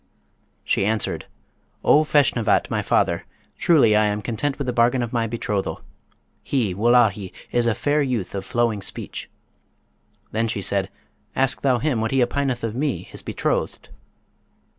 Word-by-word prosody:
She - - +1
answered, 110 +1 -1 0.6
"O 150 - +5
Feshnavat, 140 -7 +2
my - - 0
father, - - +1 0.4
truly 135 -11 +5
I 105 0 +4
am 105 0 -2
content 130 +6 -2
with 140 - -3
the 125 - -1
bargain 120 +1 +3
of 120 - -5
my 115 -1 +1
betrothal. 105 -3 -3 0.6
He, 115 -9 0
Wullahy, 105 -2 +3 0.2
is 120 -1 +2
a 115 - +2
fair 150 +1 +1
youth 125 -9 -2
of 100 -1 -3
flowing 115 -1 0
speech.' - - -6 1.0
Then 115 +1 0
she 105 -3 -2
said, 95 -1 0 0.5
'Ask 135 0 +2
thou 130 -3 +3
him 120 -2 0
what 110 - 0
he 135 0 +3
opineth 130 0 -1
of 115 -2 -2
me, 140 +2 -1
his - - -7
betrothed?" - - -2
120 Hz, 155 wpm, -23 LUFS, 105-130 Hz, 1.0 s, O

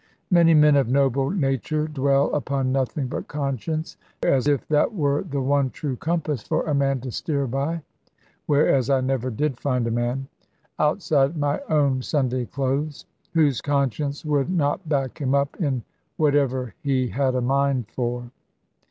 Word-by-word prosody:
Many 170 -2 +6
men 150 -1 +6
of 135 -4 +2
noble 135 0 +2
nature 155 - 0
dwell 140 -2 +1
upon 140 -3 -1
nothing 135 +1 -1
but 125 - -5
conscience; 150 +3 -3 0.3
as 135 +1 +2
if 145 -3 +1
that 155 +9 +2
were 145 -4 +1
the 140 -7 -3
one 140 0 +2
true 140 -1 -4
compass 155 -3 -2
for - - -1
a 155 - -1
man 135 -1 +1
to 130 -1 -5
steer 140 +2 -1
by 140 +6 -2 0.6
whereas 140 -3 +3
I 135 -1 +3
never 130 -1 -1
did 130 +2 -2
find 125 -4 0
a 115 - -1
man 120 +3 -1 0.5
outside 150 -1 +2
my 145 -1 0
own 140 -4 +2
Sunday 130 -3 0
clothes, 140 +2 -2 0.3
whose 145 -7 +3
conscience 140 +1 -1
would 145 0 +1
not 160 -1 0
back 135 -1 -1
him 135 -1 +1
up 140 0 0
in 135 -7 0 0.3
whatever 135 -5 +1
he 130 -4 0
had 130 0 0
a 125 - +1
mind 135 -1 +1
for. 120 0 -4
140 Hz, 160 wpm, -24 LUFS, 130-150 Hz, 0.6 s, Many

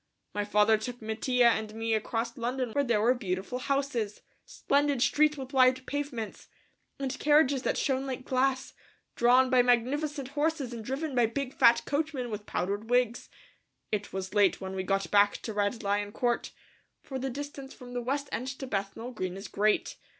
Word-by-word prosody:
My 205 - -1
father 210 +1 +4
took 245 +2 -6
Mattia 235 +3 +2
and 220 -1 -1
me 225 0 -1
across 225 +2 -1
London 245 0 -2
where 285 +5 +1
there 235 -5 +1
were 235 +4 +4
beautiful 200 +1 -3
houses, 260 -6 -1 0.3
splendid 285 -1 +1
streets 300 +1 +3
with 265 0 -7
wide 255 0 +4
pavements, 275 -6 -4 0.5
and 270 -1 -4
carriages 295 -3 +4
that - - -1
shone 270 -1 0
like 260 -1 -5
glass, 260 0 0 0.4
drawn 250 +2 +4
by 255 -1 +6
magnificent 265 +3 0
horses 290 -3 -1
and 230 -2 -6
driven 275 +5 -3
by 240 -2 +3
big 270 +3 -4
fat 235 0 +5
coachmen 285 -5 -2
with 210 0 -6
powdered 205 +5 -2
wigs. 245 -1 +1 0.6
It 205 -1 -2
was 190 0 -5
late 205 -3 +3
when 190 -1 -6
we 190 - -1
got 195 +1 -1
back 205 0 +4
to 220 - -4
Red 205 +2 -1
Lion 205 0 0
Court, 240 -1 -1 0.5
for 265 -1 -5
the 265 +1 -2
distance 275 0 -7
from 245 -1 -11
the 245 - -2
West 280 +4 -2
End 250 - -3
to 270 - -5
Bethnal 205 +2 -4
Green 185 -5 -4
is 195 +1 -7
great. 210 +1 +1
245 Hz, 180 wpm, -29 LUFS, 215-270 Hz, 0.6 s, by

